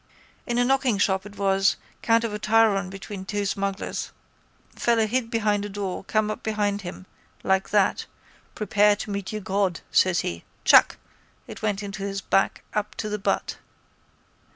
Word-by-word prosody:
—In 240 - -1
a 245 - +3
knockingshop 210 -7 +1
it 205 - -14
was 195 0 +2 0.3
count 230 0 +3
of 225 -2 -2
a 210 - -4
tryon 215 -4 +3
between 195 0 -7
two 205 +1 -2
smugglers. 195 0 -3 0.7
Fellow 230 -2 +2
hid 235 +1 -1
behind 210 -3 +1
a 205 - -4
door, 195 -2 -4
come 215 0 +1
up - - -6
behind 205 -2 -1
him. 185 0 -8 0.4
Like 190 0 +1
that. 205 -2 +2 0.5
Prepare 210 -1 +3
to 205 - -6
meet 200 -1 -4
your 215 -1 -4
God, 190 -2 0
says 185 -2 +3
he. 85 0 -4 0.2
Chuk! - - +6 0.5
It - - -10
went 210 -1 -1
into 200 -1 -6
his 195 0 -3
back 195 0 +1
up 210 0 -2
to 215 - -4
the 210 0 -3
butt. 195 - -1
205 Hz, 165 wpm, -25 LUFS, 195-215 Hz, 0.7 s, Chuk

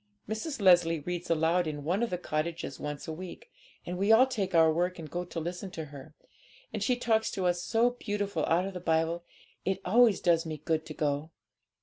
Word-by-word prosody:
Mrs. 225 +7 -4
Leslie 175 -4 +5
reads 175 +2 -4
aloud 165 +1 +2
in 145 -2 -4
one 180 +8 0
of 235 - +1
the 180 - -2
cottages 165 -3 -3
once 145 -1 -5
a 160 - -3
week; 180 +2 -9 0.3
and 180 +1 -4
we 200 +3 +3
all 230 +4 +8
take 205 -9 -2
our 160 -1 +6
work 180 +3 0
and 165 -2 -7
go 175 0 -2
to 175 -1 -6
listen 180 +4 -5
to 165 -4 -6
her, 140 -2 -11 0.6
and - - -3
she 250 - +2
talks 225 -2 +1
to 190 - -3
us 175 0 +1
so 235 +4 +2
beautiful 205 -8 -2
out 175 +3 +2
of 195 - -5
the 180 - -5
Bible; 165 0 0 0.4
it 190 0 -1
always 225 +2 +5
does 165 -2 +3
me 155 -2 -5
good 160 +1 -1
to 155 - -7
go.' 145 +1 -1
175 Hz, 215 wpm, -30 LUFS, 160-195 Hz, 0.6 s, all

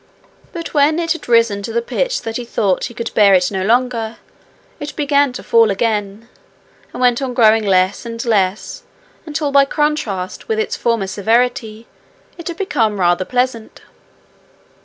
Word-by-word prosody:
But 335 -2 -7
when 300 +1 +3
it 335 -1 -1
had 335 -6 -4
risen 230 -4 +3
to 215 - -6
the 235 - 0
pitch - - -2
that 225 0 -4
he 245 - -5
thought 205 -5 -1
he - - -7
could 235 0 -5
bear 200 -2 +5
it 180 +2 +2
no 190 -1 -2
longer, 230 +1 0 0.6
it 290 0 -7
began 285 -2 +2
to - - -8
fall 230 -1 +4
again, 205 +1 -2 0.6
and - - -8
went 245 0 +2
on 255 -2 -3
growing 220 -2 +4
less 185 -1 +1
and 230 0 -6
less 200 -3 0 0.5
until 300 -1 -2
by 280 0 +6
contrast 275 - -2
with 445 -1 -1
its 440 - -1
former 230 -4 0
severity 225 +2 -1 0.5
it 340 - -9
had 340 -1 -5
become 225 - 0
rather 175 +1 +2
pleasant. 250 -2 -2
230 Hz, 165 wpm, -17 LUFS, 210-280 Hz, 0.6 s, by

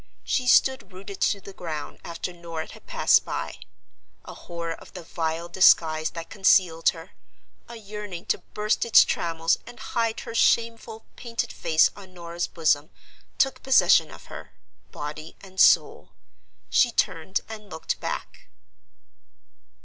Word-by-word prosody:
She 250 -2 -1
stood 265 -2 +3
rooted 195 +1 -10
to 200 - +2
the 195 - -11
ground 155 -5 -6
after 170 +1 -6
Norah 170 -2 -7
had - - -16
passed - - +4
by. - - -5 0.7
A - - -9
horror 170 -1 -6
of - - -14
the 180 - -8
vile 165 0 -3
disguise 160 -3 +4
that 165 -1 -8
concealed 185 -4 +3
her; 165 +3 -8 0.6
a 235 - -8
yearning 210 -4 -8
to - - 0 0.2
burst 210 +1 0
its 235 - +6
trammels 165 0 0
and 240 0 -12
hide 230 -1 -2
her 230 - -8
shameful 230 -1 +1
painted 235 -2 -4
face 160 0 +3
on 190 -2 -14
Norah's 170 0 -4
bosom, 155 -2 +1 0.5
took 270 -1 +1
possession 265 0 +4
of - - -13
her, - - -11 0.4
body 155 +2 -7
and 190 -1 -12
soul. - - +4 0.6
She 245 - +4
turned 180 -4 -1
and 215 -2 -10
looked - - -4
back. - - -6
185 Hz, 140 wpm, -25 LUFS, 165-215 Hz, 0.7 s, its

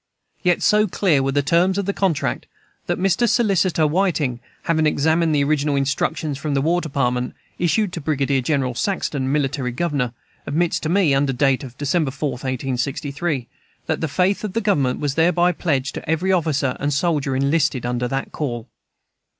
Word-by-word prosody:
Yet 180 -3 +2
so 210 0 +4
clear 175 -7 +2
were 135 0 0
the 145 +1 +1
terms 175 +7 +2
of 200 - -1
the 200 - -1
contract 185 -7 -1 0.4
that - - 0
Mr. 195 +5 +2
Solicitor 190 -8 +2
Whiting, 155 -7 0 0.2
having 160 -2 +2
examined 160 +2 +2
the 140 - +3
original 145 0 +1
instructions 140 +1 -1
from 145 -1 -2
the 135 - +2
War 170 +4 +1
Department 125 -5 -1 0.2
issued 180 +3 +1
to 170 - -4
Brigadier 140 -2 0
General 130 -2 0
Saxton, 140 -4 -1
Military 140 -3 0
Governor, 135 -3 -1 0.3
admits 170 +3 +1
to 155 - -3
me 175 -5 +3
(under 135 0 +2
date 135 +1 +2
of 125 -2 -10
December 145 +1 0
4, 140 +1 -2
1863,) 135 +3 -3 0.4
that 160 - -2
"the 160 - 0
faith 185 +8 +1
of 210 -3 -4
the 230 - +1
Government 145 - +1
was 145 -2 -1
thereby 175 +3 +3
pledged 145 -6 -1
to - - -7
every 170 +4 +1
officer 150 -7 +1
and 145 +1 -1
soldier 145 -2 0
enlisted 140 -1 +1
under 125 0 -1
that 135 +2 -3
call." 120 -6 -4
150 Hz, 175 wpm, -21 LUFS, 135-175 Hz, 0.4 s, so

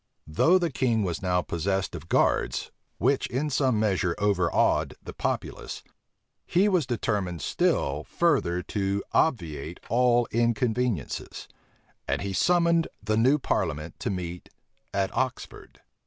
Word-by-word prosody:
Though 160 - +4
the 175 -4 0
king 120 -5 +1
was 85 -4 -2
now 90 -2 +1
possessed 95 +3 -1
of 80 -1 -8
guards, - - +1 0.3
which - - +1
in 145 +4 -2
some 130 -5 +2
measure 95 -5 +1
overawed 95 -4 +2
the - - -8
populace, - - -4 0.6
he 190 +4 +3
was 180 -9 +2
determined 100 - -2
still 70 +3 0
further 130 - +1
to 100 +1 -1
obviate 85 - 0
all 120 0 +3
inconveniences; 120 - -1 0.6
and - - -1
he 100 -1 -3
summoned 170 - +3 0.2
the 110 +1 0
new 130 +6 +4
parliament 75 - -2
to - - -2
meet 90 -2 -5 0.4
at 100 -1 -1
Oxford. - - -4
105 Hz, 125 wpm, -27 LUFS, 90-130 Hz, 0.6 s, Though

